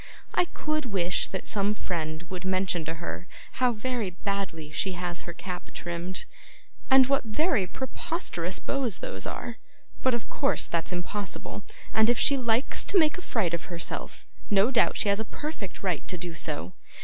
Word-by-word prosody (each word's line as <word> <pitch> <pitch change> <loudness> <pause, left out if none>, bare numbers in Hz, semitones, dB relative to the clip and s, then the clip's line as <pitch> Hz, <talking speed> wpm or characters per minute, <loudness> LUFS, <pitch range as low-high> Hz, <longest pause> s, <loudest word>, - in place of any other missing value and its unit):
I 360 - +4
could 305 -4 -1
wish 180 -4 +1
that 190 - -4
some 205 0 +1
friend 160 -4 -2
would 185 -1 -4
mention 185 -2 +1
to 165 +1 -2
her 175 +1 -5 0.3
how 250 -1 +6
very 235 -2 -1
badly 180 -4 -3
she 190 +5 0
has 175 -1 -3
her - - -1
cap 180 0 -5
trimmed, 175 +2 -3 0.6
and 265 -1 +9
what 275 +1 +3
very 235 - +2
preposterous 260 - -2
bows 260 -8 0
those 95 0 -3
are, 235 -1 -4 0.4
but 260 -2 +4
of 235 - -4
course 275 - +2
that's 170 -1 -1
impossible, 190 +3 -3 0.3
and 220 +1 +6
if 240 - +4
she 280 - +6
likes 240 -1 +1
to 405 - +3
make 315 0 +5
a - - -7
fright 200 - +1
of 170 - -1
herself, 170 -2 -4 0.2
no 205 +4 +5
doubt 245 - +4
she - - +1
has 200 +1 +3
a - - +1
perfect 225 - -5
right 180 -6 0
to 180 - -3
do 175 0 -4
so. 150 - -3
195 Hz, 175 wpm, -29 LUFS, 175-245 Hz, 0.6 s, and